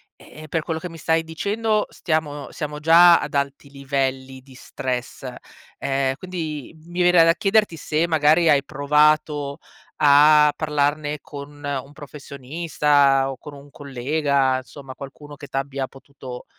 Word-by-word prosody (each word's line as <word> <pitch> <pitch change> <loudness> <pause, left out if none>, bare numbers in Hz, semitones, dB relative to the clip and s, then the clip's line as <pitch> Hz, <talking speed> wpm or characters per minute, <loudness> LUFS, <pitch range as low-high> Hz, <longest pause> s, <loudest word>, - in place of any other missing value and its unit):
ehm-ehm, 155 0 -13
per 160 +2 -1
quello 160 -1 -3
che 180 - -7
mi 165 - -11
stai 160 0 +1
dicendo, 210 +6 -1
stiamo 150 -3 -3
siamo 150 0 -6
già 170 +2 +7
ad - - -6
alti 140 0 -3
livelli 135 -1 -3
di 130 0 -18
stress, 125 -1 -5 0.5
ehm, 135 -1 0
quindi 160 -7 -6
mi 175 +1 -4
verrà 175 -1 +6
da 165 0 +5
chiederti 195 +1 +1
se, 155 +2 -1
magari, 160 +1 +3
hai 140 -2 +4
provato 150 0 +1 0.5
a 150 +1 +6
parlarne 150 0 -1
con 140 -1 -9
un 140 0 -4
professionista? 140 -1 0
O 135 - -8
con 150 - -11
un 140 0 -14
collega? 140 0 -1
Insomma, 135 0 -12
qualcuno 145 +1 -11
che 145 - -10
t'abbia 135 0 -3
potuto, 135 -2 -11
145 Hz, 140 wpm, -22 LUFS, 140-160 Hz, 0.5 s, già